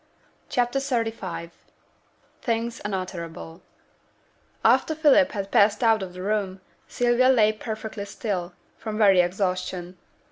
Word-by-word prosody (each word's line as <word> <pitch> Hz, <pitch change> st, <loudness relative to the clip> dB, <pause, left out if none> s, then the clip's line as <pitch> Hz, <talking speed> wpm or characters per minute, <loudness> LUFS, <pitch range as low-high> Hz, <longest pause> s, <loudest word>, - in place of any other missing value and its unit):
CHAPTER 245 Hz, +1 st, +1 dB
XXXV 225 Hz, -10 st, -3 dB, 0.9 s
THINGS 230 Hz, 0 st, -2 dB
UNUTTERABLE 180 Hz, -4 st, -5 dB, 1.0 s
After 315 Hz, -, +4 dB
Philip 290 Hz, -2 st, +4 dB
had 200 Hz, -2 st, -4 dB
passed 205 Hz, +3 st, +4 dB
out 225 Hz, -2 st, +4 dB
of 185 Hz, -2 st, -6 dB
the 180 Hz, 0 st, -7 dB
room, 200 Hz, -2 st, -1 dB, 0.3 s
Sylvia 245 Hz, +1 st, +2 dB
lay 215 Hz, -4 st, +4 dB
perfectly 215 Hz, -1 st, -6 dB
still, 195 Hz, -3 st, -4 dB, 0.3 s
from 215 Hz, -1 st, -5 dB
very 195 Hz, -4 st, +6 dB
exhaustion. 180 Hz, -1 st, -2 dB
210 Hz, 110 wpm, -25 LUFS, 185-230 Hz, 1.0 s, very